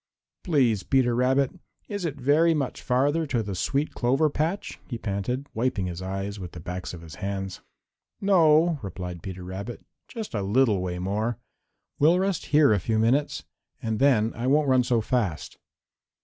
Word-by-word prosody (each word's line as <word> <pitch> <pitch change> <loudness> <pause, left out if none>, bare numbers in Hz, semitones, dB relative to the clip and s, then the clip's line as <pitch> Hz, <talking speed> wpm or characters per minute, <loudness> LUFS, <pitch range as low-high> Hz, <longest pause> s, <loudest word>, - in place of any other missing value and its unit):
"Please, 130 - +2
Peter 130 0 +2
Rabbit, 130 +2 +2 0.4
is 205 -4 -4
it 150 -4 -2
very 155 +5 +4
much 140 -4 -2
farther 145 +5 +1
to 120 -5 0
the 100 -1 -4
sweet 140 - -1
clover 135 +5 +2
patch?" 165 +7 -2
he 120 - -4
panted, 115 +5 -3
wiping 110 -4 0
his 90 0 -5
eyes 95 +2 -4
with 90 -2 -7
the 85 - -8
backs 90 +2 -5
of 85 - -11
his 80 -2 -11
hands. 95 -1 -4 0.6
"No," 165 -4 +4
replied 90 -3 -6
Peter 95 0 -7
Rabbit, 95 +6 -7 0.2
"just 225 -4 -7
a 105 - -1
little 105 0 +2
way 90 -1 -3
more. 105 +5 -1 0.6
We'll 160 +5 +5
rest 190 -2 -1
here 150 -6 +5
a 100 - +2
few 110 +5 -1
minutes 125 +7 +1 0.4
and 110 -1 -2
then 120 -5 +3
I 120 +2 -3
won't 145 +2 +3
run 130 -1 +5
so 120 -2 +1
fast." 105 - -2
120 Hz, 170 wpm, -26 LUFS, 95-145 Hz, 0.6 s, We'll